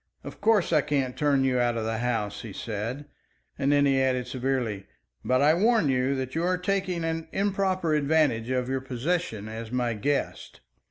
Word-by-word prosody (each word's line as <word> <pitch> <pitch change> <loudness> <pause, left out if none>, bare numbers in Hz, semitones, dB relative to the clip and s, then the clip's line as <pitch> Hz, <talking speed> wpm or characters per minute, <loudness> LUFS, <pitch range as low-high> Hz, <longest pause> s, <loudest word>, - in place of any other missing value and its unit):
"Of - - -10
course, 210 -5 +3
I 155 - +5
can't 140 -3 -1
turn 145 -2 +2
you 130 -1 +2
out 120 -1 +1
of 110 - -2
the 110 0 -2
house," 115 -4 -2
he 110 -4 -8
said; 115 +8 -4 0.5
and 140 0 +2
he 140 -2 +3
added 130 -1 +1
severely, 125 -6 -2 0.4
"But 130 +2 +2
I 150 +2 +6
warn 215 -2 +3
you 130 +1 +1
that 130 -1 -4
you 165 - -1
are 180 +1 +1
taking 185 -2 -1
an 165 0 -2
improper 190 -4 0
advantage 145 -6 +2
of 125 -1 0
your 135 0 -1
position 130 - -2
as 110 +1 -7
my 125 -2 0
guest." 140 +7 -3
135 Hz, 180 wpm, -27 LUFS, 120-160 Hz, 0.5 s, I